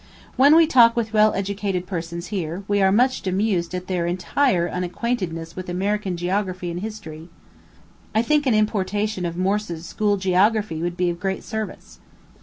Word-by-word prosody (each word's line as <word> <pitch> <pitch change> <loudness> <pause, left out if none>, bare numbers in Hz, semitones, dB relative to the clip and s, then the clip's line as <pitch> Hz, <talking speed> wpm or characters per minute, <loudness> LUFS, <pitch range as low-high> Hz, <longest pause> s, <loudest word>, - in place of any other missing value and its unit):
When 285 +4 +6
we 330 0 +7
talk 240 -6 +5
with 225 -2 -2
well 215 0 +5
educated 195 -2 -2
persons 170 -1 -5
here, 175 0 -3
we 205 0 +1
are 190 0 +4
much 250 +1 +2
amused 185 -2 0
at 180 0 -4
their 180 -2 -1
entire 180 +1 +1
unacquaintedness 180 -2 -3
with 185 -1 -6
American 195 0 -1
geography 185 0 -2
and 170 - -4
history. 180 -6 -8 0.9
I 220 - +3
think 295 +3 +2
an 240 - +3
importation 210 -2 0
of 170 0 -6
Morse's 185 -3 -1
School 205 +1 0
Geography 190 -1 +1
would 175 +1 -3
be 180 -1 +1
of 170 - -7
great 190 +1 -2
service. 220 -1 -6
190 Hz, 165 wpm, -22 LUFS, 175-215 Hz, 0.9 s, we